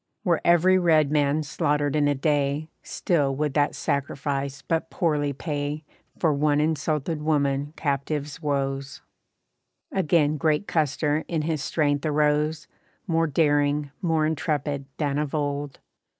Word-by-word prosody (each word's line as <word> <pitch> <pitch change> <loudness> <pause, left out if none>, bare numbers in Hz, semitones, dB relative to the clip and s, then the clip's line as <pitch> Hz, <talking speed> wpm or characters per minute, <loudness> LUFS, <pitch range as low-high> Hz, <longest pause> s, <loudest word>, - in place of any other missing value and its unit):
Were 175 -5 +1
every 180 +2 +5
red 155 -5 +3
man 150 0 +2
slaughtered 145 -1 0
in 145 -1 +3
a 145 - +2
day, 145 +1 0
Still 145 -6 0
would 150 0 -1
that 145 0 +1
sacrifice 140 -1 -2
but 165 0 -1
poorly 150 -4 0
pay 145 +1 -4 0.3
For 160 -3 +2
one 145 +1 +2
insulted 155 0 -1
woman 145 -1 0
captive's 145 +1 -2
woes. 135 -2 -2 0.9
Again 155 -4 +2
great 155 +5 +1
Custer 150 -1 0
in 160 -3 -1
his 155 -2 -2
strength 145 -3 0
arose, 150 +1 +1 0.4
More 165 -2 +1
daring, 145 -1 +1
more 165 -4 +1
intrepid 145 -2 -1
than 145 -2 0
of 150 0 -2
old. 145 -1 -2
150 Hz, 130 wpm, -25 LUFS, 145-155 Hz, 0.9 s, every